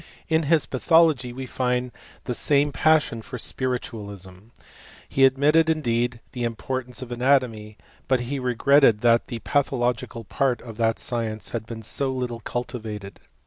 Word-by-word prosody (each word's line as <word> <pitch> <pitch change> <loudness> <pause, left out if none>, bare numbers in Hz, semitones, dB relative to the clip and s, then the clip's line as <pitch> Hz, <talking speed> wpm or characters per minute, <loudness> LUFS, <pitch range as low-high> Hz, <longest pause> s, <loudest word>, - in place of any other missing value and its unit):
In 160 0 +3
his 165 -3 +4
pathology 150 -2 +3
we 130 +2 -6
find 125 -1 -1 0.3
the 125 - -3
same 145 +3 +2
^ioQ 150 -8 +2
for 125 +2 -7
spiritualism. 105 -7 -5 0.6
He 135 - +4
admitted, 150 +5 +4
indeed, 120 -6 0
the 125 - -6
^rtance 125 +2 -4
of 125 - -10
anatomy, 120 -4 +1 0.3
but 130 -1 +2
he 135 +3 -3
regretted 125 -2 +4
that 115 -1 +3
the 120 - -5
thological 125 -5 -1
part 130 -4 0
of 115 -3 -10
that 115 -1 +1
science 115 -3 -2
had 115 -2 -5
been 115 -1 -7
so 135 +5 -1
little 125 -3 -4
Itivated. 110 -5 -5
125 Hz, 145 wpm, -24 LUFS, 115-135 Hz, 0.6 s, his